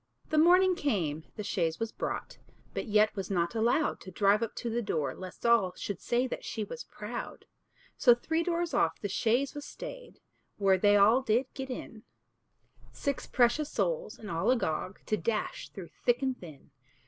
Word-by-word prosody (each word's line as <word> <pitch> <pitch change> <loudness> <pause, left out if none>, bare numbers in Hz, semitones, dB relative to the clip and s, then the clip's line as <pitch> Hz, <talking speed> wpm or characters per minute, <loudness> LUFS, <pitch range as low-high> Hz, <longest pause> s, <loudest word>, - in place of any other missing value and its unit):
The 310 - +4
morning 365 +3 +6
came, 175 - -1
the 210 - -5
chaise 170 -5 -1
was 225 -1 -2
brought, - - -4 0.3
But - - -3
yet 215 0 +3
was 195 -2 -4
not 170 -3 0
allowed 235 +7 +1
To - - -9
drive 200 +3 +3
up 230 - -3
to - - -4
the 235 +1 0
door, 150 - -1
lest 185 +4 -9
all 225 -6 +4
Should 200 -1 -5
say 240 +2 +1
that 255 - -5
she 220 - -3
was 475 - -7
proud. - - -7 0.5
So 240 -2 +7
three 320 +7 -1
doors 340 0 -1
off 165 0 +2
the 205 - -3
chaise 235 +7 +1
was 290 - -6
stayed, - - -9 0.4
Where 195 -2 +3
they 205 +1 +5
did - - +6
all 220 +6 +6
get 260 +3 -1
in; 230 -3 -7 0.9
Six 280 -2 -3
precious 255 +5 +2
souls, - - -1
and 210 - -8
all 165 0 0
agog 195 -6 0
To 215 - 0
dash 230 0 -2
through 185 -4 -9
thick 245 +2 +2
and 260 -1 +1
thin. 160 - -13
225 Hz, 185 wpm, -30 LUFS, 195-265 Hz, 0.9 s, So